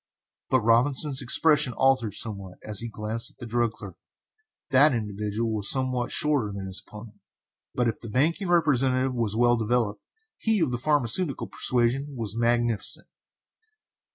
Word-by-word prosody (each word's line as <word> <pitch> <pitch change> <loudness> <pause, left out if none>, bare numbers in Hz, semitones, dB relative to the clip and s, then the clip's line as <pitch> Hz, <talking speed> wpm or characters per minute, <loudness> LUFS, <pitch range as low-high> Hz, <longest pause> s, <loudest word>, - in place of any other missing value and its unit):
But 130 -2 +3
Robinson's 130 +5 +2
expression 140 +1 +3
altered 130 -6 +1
somewhat 100 -5 -3
as 105 -2 -1
he 115 - +1
glanced 110 +2 -4
at - - -21
the - - -9
drug 120 0 0
clerk. - - -11 0.7
That 135 +1 +5
individual 105 +1 -3
was 105 -2 0
somewhat 130 -2 -1
shorter 145 -9 +1
than 100 -1 -6
his 95 0 -6
opponent, 105 -1 -12 0.6
but 125 -1 +1
if 115 - -2
the 115 - -9
banking 160 - 0
representative 135 -6 +2
was 115 -4 -2
well 120 +1 +3
developed, 110 -2 -1 0.4
he 220 -2 +1
of 160 -7 +1
the 120 - -3
pharmaceutical 145 +2 +1
persuasion 130 +4 -1
was 110 -4 -3
magnificent. 120 -1 -1
120 Hz, 150 wpm, -26 LUFS, 110-135 Hz, 0.7 s, That